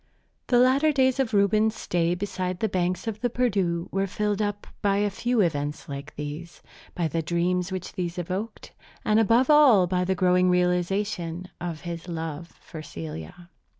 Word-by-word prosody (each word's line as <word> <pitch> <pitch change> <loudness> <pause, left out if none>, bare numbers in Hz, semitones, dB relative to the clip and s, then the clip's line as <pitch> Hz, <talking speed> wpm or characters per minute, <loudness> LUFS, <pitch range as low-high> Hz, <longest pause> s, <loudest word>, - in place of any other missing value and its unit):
The 245 - +3
latter 265 +5 +4
days 260 -2 +2
of 265 -4 +1
Reuben's 215 +2 +3
stay 175 -3 0
beside 185 -1 -3
the 220 - +1
banks 180 -2 -1
of 215 -1 -4
the 245 - +1
Perdu 195 -9 0
were 195 +1 0
filled 210 +1 -1
up 205 -1 -2 0.2
by 200 -1 +2
a 205 0 +1
few 240 +3 0
events 145 -4 -1
like 140 +1 -7
these, 150 +4 -7 0.3
by 170 -2 0
the 165 +2 -1
dreams 175 +3 0
which 185 -1 -5
these 175 -1 -4
evoked, 185 +6 -5 0.3
and 215 +1 +4
above 230 +6 +4
all 270 -11 +7
by 180 0 0
the 190 +1 0
growing 180 0 +3
realization 180 0 0
of 170 -3 -4
his 170 0 -6
love 165 -1 -5
for 160 - -9
Celia. 80 - -8
180 Hz, 170 wpm, -26 LUFS, 170-210 Hz, 0.3 s, all